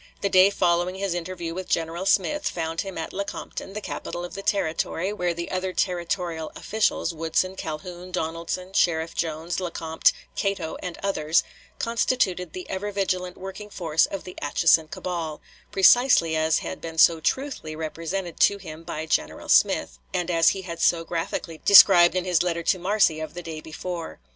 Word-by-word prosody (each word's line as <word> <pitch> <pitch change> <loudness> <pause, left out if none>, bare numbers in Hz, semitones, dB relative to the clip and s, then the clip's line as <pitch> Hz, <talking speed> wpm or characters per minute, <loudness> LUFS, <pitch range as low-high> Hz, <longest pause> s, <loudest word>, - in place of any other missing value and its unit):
The 200 - +1
day 185 +1 +6
following 175 -1 +1
his 195 -1 -2
interview 175 -1 -4
with 185 +1 -6
General 165 +3 -1
Smith 295 +11 +2
found 165 -1 -3
him 195 -2 -7
at 160 - -5
Lecompton, 200 0 -5
the 210 - -5
capital 175 -3 -5
of 175 - -9
the 195 - -6
Territory, 190 0 -1
where 180 -4 -1
the 170 0 -5
other 185 0 -2
territorial 175 -3 -2
officials, 210 -5 0
Woodson, 165 +4 -1
Calhoun, 175 +2 -6
Donaldson, 170 +2 -3
Sheriff 165 -3 +1
Jones, 165 +1 -3
Lecompte, 165 -3 +1 0.2
Cato, 195 -5 -2
and 180 -2 -5
others, 165 -5 +2 0.3
constituted 210 -7 0
the 185 - -7
ever 205 +2 -3
vigilant 185 -2 -2
working 195 +2 -8
force 165 -5 +1
of 195 - -6
the 180 - -10
Atchison 160 +2 +3
cabal, 165 -2 -4 0.3
precisely 195 -4 +5
as 160 0 +2
had 185 - -6
been 165 -1 -7
so 165 0 +6
truthfully 255 - -2
represented 165 +3 -4
to 200 - +4
him 165 -5 -9
by 160 -2 -5
General 160 - -2
Smith, - - +3 0.2
and 180 0 -1
as 165 -1 +5
he 190 - -3
had 170 -2 -6
so 165 -1 +3
graphically 165 -1 -4
described 185 -3 +8
in 185 -1 0
his 180 -4 +2
letter 170 -1 -1
to 185 +2 +2
Marcy 185 -4 +2
of 155 +1 -6
the 175 - -6
day 160 -2 -6
before. 165 +2 -6
175 Hz, 170 wpm, -25 LUFS, 165-190 Hz, 0.3 s, described